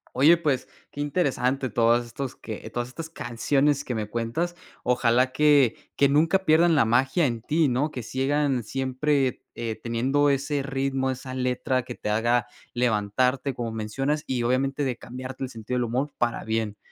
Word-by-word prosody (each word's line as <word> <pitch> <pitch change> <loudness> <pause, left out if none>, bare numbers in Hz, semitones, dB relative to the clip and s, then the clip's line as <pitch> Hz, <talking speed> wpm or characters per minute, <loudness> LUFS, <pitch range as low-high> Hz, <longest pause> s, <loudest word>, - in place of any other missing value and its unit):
Oye, 150 +7 +6
pues, 145 -6 -1 0.2
qué 145 - -5
interesante 135 - 0
todos 120 +1 +3
estos 130 +2 -6
que 110 -2 -8
todas 120 0 -3
estas 160 +5 -7
canciones 140 +1 0
que 125 - -4
me 105 -1 -2
cuentas. 120 +11 -2 0.3
Ojalá 125 +1 +2
que 145 -4 +4 0.2
que 140 - +4
nunca 165 +7 +2
pierdan 165 +2 +5
la 140 - +4
magia 135 +8 +2
en 115 -4 -1
ti, 155 +4 +2
¿no? 130 +5 +1
Que 125 -5 -6
sigan 135 0 0
siempre, 135 +2 0
eh, 115 -2 -3
teniendo 130 +5 +2
ese 140 +1 0
ritmo, 135 -1 -1
esa 130 0 -5
letra 130 0 0
que 125 -1 -8
te 105 - -5
haga 120 +1 +2 0.3
levantarte, 125 +3 +1
como 115 -2 -3
mencionas, 135 +8 -2
y 125 -2 -1
obviamente 135 +3 0
de 125 -3 -1
cambiarte 130 +2 -7
el - - -8
sentido 115 +1 -4
del 125 - +1
humor 130 +6 -2
para 120 -1 0
bien. 110 -2 -2
130 Hz, 170 wpm, -25 LUFS, 120-145 Hz, 0.3 s, Oye